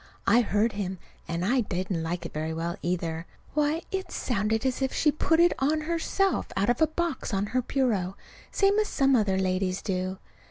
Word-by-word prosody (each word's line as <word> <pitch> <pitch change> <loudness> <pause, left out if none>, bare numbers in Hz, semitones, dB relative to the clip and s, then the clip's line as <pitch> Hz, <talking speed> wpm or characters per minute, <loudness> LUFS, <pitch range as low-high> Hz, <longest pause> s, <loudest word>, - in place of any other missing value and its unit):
I 240 - +5
heard 220 0 +1
him. 190 -2 -3 0.3
And 170 +2 -2
I 250 +5 +3
didn't 185 -4 -2
like 170 +2 -3
it - - -7
very 155 +1 -2
well, 170 +2 -2
either. 165 -1 -2 0.3
Why, 300 +2 +1
it 380 0 -3
sounded 220 0 0
as 260 +1 0
if 265 - +1
she 300 - +3
put 325 +2 +2
it 345 +1 +6
on 305 +3 +2
herself 340 +4 0
out 200 +5 +3
of 245 - -2
a 315 - +6
box 315 -8 -2
on 195 +1 +1
her 255 - +3
bureau, 220 -8 0 0.4
same 400 +1 +3
as 425 - +1
some 270 -1 +3
other 205 -5 +2
ladies 185 0 0
do! 185 -1 -2
220 Hz, 195 wpm, -27 LUFS, 185-300 Hz, 0.4 s, it